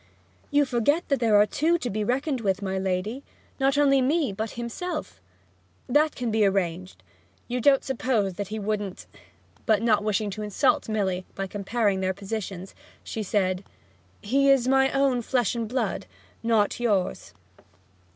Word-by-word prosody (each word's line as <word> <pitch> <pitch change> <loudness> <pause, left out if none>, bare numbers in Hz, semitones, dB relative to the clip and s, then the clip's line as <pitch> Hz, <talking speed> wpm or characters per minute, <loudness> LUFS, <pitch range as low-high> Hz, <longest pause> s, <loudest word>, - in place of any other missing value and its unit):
'You 290 -1 +3
forget 270 +6 +1
that 275 - +2
there 225 -3 +3
are 205 - +6
two 325 +9 +1
to 250 -7 -4
be 210 +2 -1
reckoned 260 +3 -1
with, 195 -1 0
my 190 -1 -2
lady. 190 +7 -2 0.4
Not 270 +1 +2
only 275 -2 +4
me, 285 -3 +1
but 220 +3 -4
himself.' 305 - -5 0.7
'That 300 +4 +2
can 245 -3 -2
be 220 0 +2
arranged. 185 -2 -1 0.4
You 250 0 -2
don't 275 +1 +4
suppose 235 -7 0
that 205 +2 -5
he 215 +2 -5
wouldn't 205 - -3 0.3
' 90 +1 -33
But 220 0 +3
not 215 -3 +3
wishing 210 0 0
to 215 +3 -6
insult 210 +1 +1
Milly 190 -4 -1
by 195 - -3
comparing 205 +1 -1
their 190 0 -1
positions, 195 -2 -5 0.3
she 220 - -5
said, 185 -2 0 0.6
'He 275 +6 +3
is 265 -3 +4
my 270 0 +4
own 275 -3 +2
flesh 245 -1 0
and 230 -2 -3
blood, 255 +4 -2 0.3
not 225 -2 +1
yours.' 205 -6 -1
220 Hz, 160 wpm, -26 LUFS, 195-265 Hz, 0.7 s, are